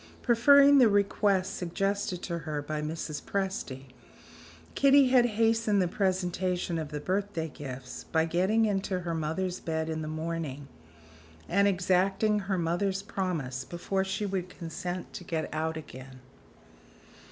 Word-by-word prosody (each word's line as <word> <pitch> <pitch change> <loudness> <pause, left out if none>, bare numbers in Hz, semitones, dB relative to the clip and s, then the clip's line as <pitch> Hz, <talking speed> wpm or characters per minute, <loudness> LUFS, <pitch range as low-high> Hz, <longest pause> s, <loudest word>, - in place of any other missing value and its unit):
Preferring 280 +4 +6
the 240 -4 +7
request 200 -1 +1
suggested 190 +1 -2
to 170 -1 -3
her 155 -2 -4
by 150 +1 -3
Mrs. 155 -1 -4
Presty, 150 -10 -4 0.8
Kitty 275 -1 +5
had 250 -2 +5
hastened 225 -2 +3
the 180 - +2
presentation 180 -2 -1
of 155 -2 -5
the 150 -1 -4
birthday 185 0 -2
gifts, 130 -3 -8
by 160 0 +3
getting 190 +7 +2
into 195 -3 -1
her 170 -1 -3
mother's 165 +4 -2
bed 160 -1 -2
in 160 0 -3
the 155 - -4
morning, 155 -3 -4 0.8
and 200 +3 +3
exacting 195 +3 +2
her 195 -1 -2
mother's 185 +3 -1
promise 155 -11 -3
before 190 +5 -2
she 200 +2 -2
would 190 -2 -3
consent 175 +1 -6
to - - -7
get 165 -2 -2
out 160 +1 -2
again. 130 -3 -10
180 Hz, 140 wpm, -29 LUFS, 160-200 Hz, 0.8 s, the